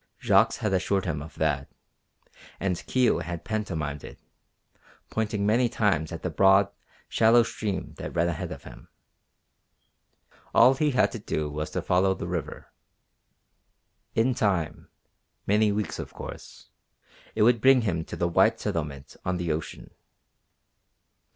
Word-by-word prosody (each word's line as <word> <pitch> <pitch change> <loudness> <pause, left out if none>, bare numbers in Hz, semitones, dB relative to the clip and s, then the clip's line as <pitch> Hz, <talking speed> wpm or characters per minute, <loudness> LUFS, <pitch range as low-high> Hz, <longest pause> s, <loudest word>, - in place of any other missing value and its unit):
Jacques - - +4
had 105 -3 -2
assured 95 +1 0
him 80 -5 -2
of 80 - -10
that, 75 -3 -1 0.9
and 90 -2 -2
Kio 130 -2 +2
had 85 +3 -6
pantomimed 80 - -3
it, - - -10 0.9
pointing 105 -2 -1
many 120 +3 +3
times 100 -9 0
at 80 - -7
the 90 - -2
broad, 95 +3 +4 0.4
shallow 115 +1 +5
stream 105 -3 -4
that - - -7
ran 85 0 +2
ahead 85 - -3
of - - -8
him. - - -13 1.7
All 125 +3 +7
he 150 +2 +1
had 130 -3 +2
to 115 - -6
do 75 -7 -3
was 75 +1 -4
to - - -3
follow 95 +1 +2
the - - -6
river. 85 -4 -5 1.4
In 120 +3 +3
time, 95 - -1 0.6
many 105 +1 +3
weeks, 105 0 -3
of - - -7
course, - - -10 0.6
it 110 - +3
would 115 0 +4
bring 130 0 +6
him 85 -7 -1
to - - -7
the 85 - 0
white 85 - +3
settlement 75 -4 -4
on 90 0 -1
the 85 -2 -2
ocean. 75 +1 -5
95 Hz, 145 wpm, -26 LUFS, 80-110 Hz, 1.7 s, All